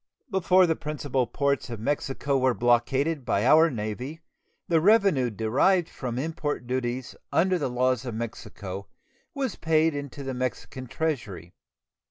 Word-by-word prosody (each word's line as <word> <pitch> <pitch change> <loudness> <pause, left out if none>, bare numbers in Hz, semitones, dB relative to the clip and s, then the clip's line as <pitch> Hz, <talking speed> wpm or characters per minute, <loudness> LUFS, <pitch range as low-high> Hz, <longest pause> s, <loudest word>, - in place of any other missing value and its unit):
Before 185 -1 +4
the 165 -2 +1
principal 145 -5 -2
ports 140 +3 -1
of 115 -3 -5
Mexico 140 +2 -1
were 130 -2 +2
blockaded 130 +5 +1
by 100 -2 0
our 160 +5 +6
Navy 125 +5 -5 0.5
the 165 -2 +3
revenue 195 - +4
derived 130 - +2
from 125 -2 -5
import 145 -2 -3
duties 125 0 -3 0.2
under 185 +1 +2
the 140 - -1
laws 125 -1 +1
of 120 -4 -5
Mexico 100 -4 -6 0.5
was 265 -7 -2
paid 160 0 +2
into 145 -1 -6
the 135 -1 -4
Mexican 130 0 -4
treasury. 115 - -3
135 Hz, 140 wpm, -26 LUFS, 120-160 Hz, 0.5 s, our